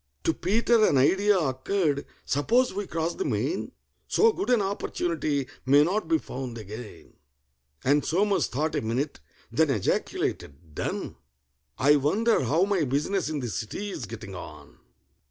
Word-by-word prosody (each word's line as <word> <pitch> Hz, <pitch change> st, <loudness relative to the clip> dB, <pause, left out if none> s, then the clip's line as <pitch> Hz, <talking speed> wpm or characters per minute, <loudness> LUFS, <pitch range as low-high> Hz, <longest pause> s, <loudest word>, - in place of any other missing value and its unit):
To 165 Hz, -, +2 dB
PETER 225 Hz, +6 st, +2 dB
an 140 Hz, -, +3 dB
idea 195 Hz, +9 st, +4 dB
occurred. 145 Hz, +1 st, 0 dB, 0.2 s
"Suppose 235 Hz, -, +2 dB
we 205 Hz, +1 st, -4 dB
cross 165 Hz, +1 st, -2 dB
the -, -, -3 dB
main? -, -, -1 dB, 0.4 s
So 455 Hz, -, +4 dB
good 390 Hz, -, -3 dB
an 245 Hz, -2 st, +5 dB
opportunity 170 Hz, -7 st, -1 dB, 0.2 s
may 140 Hz, +3 st, +6 dB
not 185 Hz, +3 st, 0 dB
be 165 Hz, 0 st, +3 dB
found 130 Hz, -5 st, -6 dB
again." 110 Hz, +1 st, -9 dB, 0.7 s
And 145 Hz, +2 st, +3 dB
SOMERS 195 Hz, +4 st, +1 dB
thought 150 Hz, +5 st, -2 dB
a -, -, 0 dB
minute, 125 Hz, +6 st, -2 dB, 0.3 s
then 160 Hz, -1 st, +2 dB
ejaculated, 80 Hz, -, -2 dB
"Done! -, -, -4 dB, 0.6 s
I 145 Hz, +3 st, +5 dB
wonder 200 Hz, -, +2 dB
how 160 Hz, +9 st, +3 dB
my 195 Hz, -4 st, +1 dB
business 150 Hz, +6 st, 0 dB
in 150 Hz, -3 st, -2 dB
the 125 Hz, -, -3 dB
City's 120 Hz, -, -4 dB
getting 110 Hz, -2 st, -8 dB
on?" 90 Hz, -, -10 dB
155 Hz, 145 wpm, -27 LUFS, 130-195 Hz, 0.7 s, may